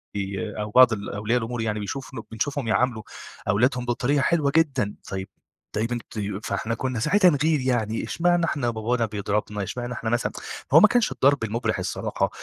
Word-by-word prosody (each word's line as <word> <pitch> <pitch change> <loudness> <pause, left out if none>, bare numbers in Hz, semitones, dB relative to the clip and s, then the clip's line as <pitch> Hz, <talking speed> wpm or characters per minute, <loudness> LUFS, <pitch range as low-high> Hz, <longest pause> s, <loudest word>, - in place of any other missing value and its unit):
ي 100 +1 -3
أو 105 0 -4
بعض 125 -1 +7
الأولياء 105 +3 -1
الأمور 115 +1 -4
يعني 105 -1 -1
بيشوف 130 +7 -5
له 115 -4 -6
بنشوفهم 130 +3 -2
يعاملوا 110 -1 +1 0.4
أولادهم 125 +5 +2
بطريقة 125 +4 +1
حلوة 145 0 +2
جدًا، 135 -10 +2
طيّب 95 0 -4 0.5
طيّب 115 +3 -1
أنت 120 -2 -5
ي 100 -1 -3
فإحنا 115 +1 -2
كنّا 130 -2 -2
ساعتها 180 - +5
نغير 150 +1 +2
يعني 120 -4 0
إشمعنا 175 +8 +1
إحنا 140 -7 -1
بابانا 115 +1 0
بيضربنا، 105 -1 -2
إشمعنا 120 +4 -4
إحنا 115 -1 -3
مثلًا 120 +1 0 0.4
هو 160 - +10
ما 215 - +8
كانش 240 +1 +2
الضرب 140 -2 +3
المُبرح 115 +2 -1
الصراحة، - - -1
120 Hz, 175 wpm, -24 LUFS, 105-135 Hz, 0.5 s, هو